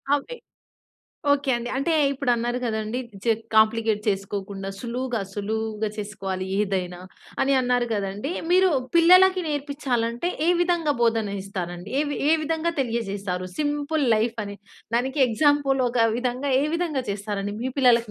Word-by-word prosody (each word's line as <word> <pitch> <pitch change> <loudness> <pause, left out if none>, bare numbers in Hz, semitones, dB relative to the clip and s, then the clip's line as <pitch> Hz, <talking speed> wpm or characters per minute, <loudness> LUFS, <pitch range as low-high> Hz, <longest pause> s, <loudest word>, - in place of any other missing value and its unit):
అవే 290 - -5 1.0
okay 285 -1 +1
అండి. 240 0 -5
అంటే 275 +5 0 0.2
ఇప్పుడు 275 -2 -1
అన్నారు 240 +1 -1
కదండీ. 220 +1 -2 0.2
జిగ్ 225 -1 +1
కాంప్లికేట్ 220 0 +3
చేసుకోకుండా 195 -1 -3
సులువుగా, 245 -1 -3
సులువుగా 220 +1 -2
చేసుకోవాలి 195 -3 -4
ఏదైనా, 190 -3 -1 0.4
అని 270 +1 +2
అన్నారు 245 -1 +1
గదండీ. 205 - -3 0.2
మీరు 370 0 +5 0.3
పిల్లలకి 370 +2 +6
నేర్పిచ్చాలంటే, 280 -2 -1 0.2
ఏ - - +3
విధంగా 345 -4 +1
బోధన 225 -3 +1
ఇస్తారండి? 180 0 -6
ఏ - - +4 0.3
ఏ - - +6
విధంగా 325 +2 -1
తెలియజేసారు 200 -7 -2
సింపుల్ 295 0 0
లైఫ్ 225 +2 0
అని. 200 0 -7 0.4
దానికి 265 +4 -1
ఎగ్జాంపుల్ 275 +2 +2
ఒక 240 0 0 0.2
విధంగా 255 +3 -2
ఏ - - +1
విధంగా 330 -6 -1
చేస్తారండి? 200 0 -3
మీ 260 - -1
పిల్లలకి 235 -4 +4
235 Hz, 135 wpm, -24 LUFS, 205-285 Hz, 1.0 s, పిల్లలకి